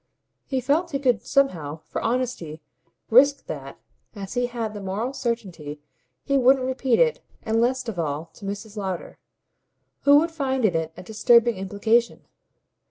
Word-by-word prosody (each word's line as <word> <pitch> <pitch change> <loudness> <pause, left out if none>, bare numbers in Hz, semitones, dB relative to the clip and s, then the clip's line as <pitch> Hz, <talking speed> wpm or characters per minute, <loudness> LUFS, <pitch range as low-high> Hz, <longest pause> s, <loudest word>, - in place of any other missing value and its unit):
He 265 -2 -1
felt 305 +7 +1
he 285 - -1
could 250 -6 +1
somehow, 160 - 0
for - - -4
honesty, 230 -10 -2 0.5
risk 280 +4 +5
that, - - -7 0.4
as 195 -2 -7
he 245 0 0
had 230 -3 -4
the 205 - -7
moral 205 +7 -3
certainty 185 - -4 0.5
she 275 -1 +3
wouldn't 260 +1 +4
repeat 260 0 +1
it 485 -1 +2 0.2
and 225 0 +1
least 255 +1 0
of 210 -6 -4
all 155 -1 -2
to - - -16
Mrs. 205 +2 -6
Lowder, 190 -4 -5 0.8
who 285 0 +7
would 330 +3 +2
find 265 -6 -1
in 195 - +3
it 160 0 -1
a - - -8
disturbing 235 +3 +4
implication. 210 +5 0
235 Hz, 160 wpm, -24 LUFS, 195-265 Hz, 0.8 s, who